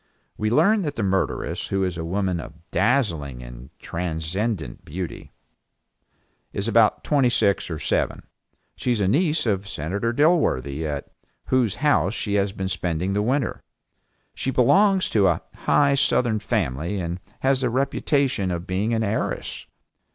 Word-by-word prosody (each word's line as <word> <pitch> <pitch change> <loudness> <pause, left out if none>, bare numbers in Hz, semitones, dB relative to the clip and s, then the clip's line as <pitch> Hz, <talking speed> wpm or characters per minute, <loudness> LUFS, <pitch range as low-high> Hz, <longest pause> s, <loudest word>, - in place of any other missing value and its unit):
We 110 - -1
learn 175 - +4
that 145 -5 -3
the 110 - -2
murderess, 95 -1 -1
who 95 0 0
is 90 -2 -1
a 80 - -4
woman 90 +1 -1
of 80 0 -9
dazzling 85 - 0
and - - -10
transcendent 85 - -3
beauty 85 +3 -6 1.2
and 100 +2 -3
about 115 -1 +3
twenty 140 -4 +3
six 105 -6 +1
or 80 - -3
seven, - - -1 0.6
is 120 -3 +1
a 100 - +2
niece 155 - +2
of 100 -3 0
Senator 100 +10 -2
Dilworthy 120 - +2
at 70 -2 -4 0.4
whose 125 -6 +2
house 100 - +3
she 100 - -2
has 100 -1 +2
been 95 -1 -4
spending 90 0 -1
the 105 - +1
winter. 125 +3 0 0.7
She - - -3
belongs 190 - +4
to 100 -3 +4
a 85 -2 +1
high 140 -1 +3
Southern 120 -4 +2
family, 95 - -1
and 85 0 -3 0.2
has 135 0 +2
the 125 - +1
reputation 135 -4 0
of 85 -1 -3
being 100 +6 0
an 110 - 0
heiress. 105 +1 -3
100 Hz, 150 wpm, -24 LUFS, 85-125 Hz, 1.2 s, learn